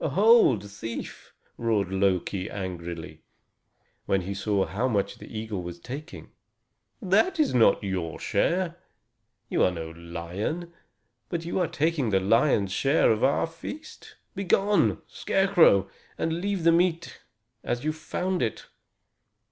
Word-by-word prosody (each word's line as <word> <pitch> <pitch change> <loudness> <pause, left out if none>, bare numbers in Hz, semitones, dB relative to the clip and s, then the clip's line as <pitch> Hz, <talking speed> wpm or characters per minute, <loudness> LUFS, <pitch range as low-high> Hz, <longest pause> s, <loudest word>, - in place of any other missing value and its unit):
"Hold, 160 - +4
thief!" 115 +3 -7 0.3
roared 110 -5 0
Loki 95 0 0
angrily, 85 -4 -6 0.9
when 95 -1 +2
he 95 +2 -4
saw 100 0 0
how 110 +7 -1
much 105 -6 -1
the - - -11
eagle 110 -3 -4
was 85 0 -7
taking. 135 - -8 0.7
"That 220 - +2
is 300 - +2
not 115 -5 +4
your 90 -5 -3
share; 175 -1 0 0.7
you - - 0
are - - +5
no 80 -2 -6
lion, 85 - -5 0.6
but 170 -1 -3
you 175 - -1
are 180 - +2
taking 150 -5 0
the 95 -2 +3
lion's 105 0 +2
share 135 +9 +3
of 110 0 0
our 135 +2 +3
feast. 220 - -10 0.2
Begone, 200 +1 +2
Scarecrow, 180 - +3 0.3
and 165 - -1
leave 200 -3 -1
the 165 - +6
meat 170 0 0 0.4
as 120 - -2
you 155 +1 0
found 180 +4 -3
it!" 115 - -2
115 Hz, 130 wpm, -26 LUFS, -, 0.9 s, the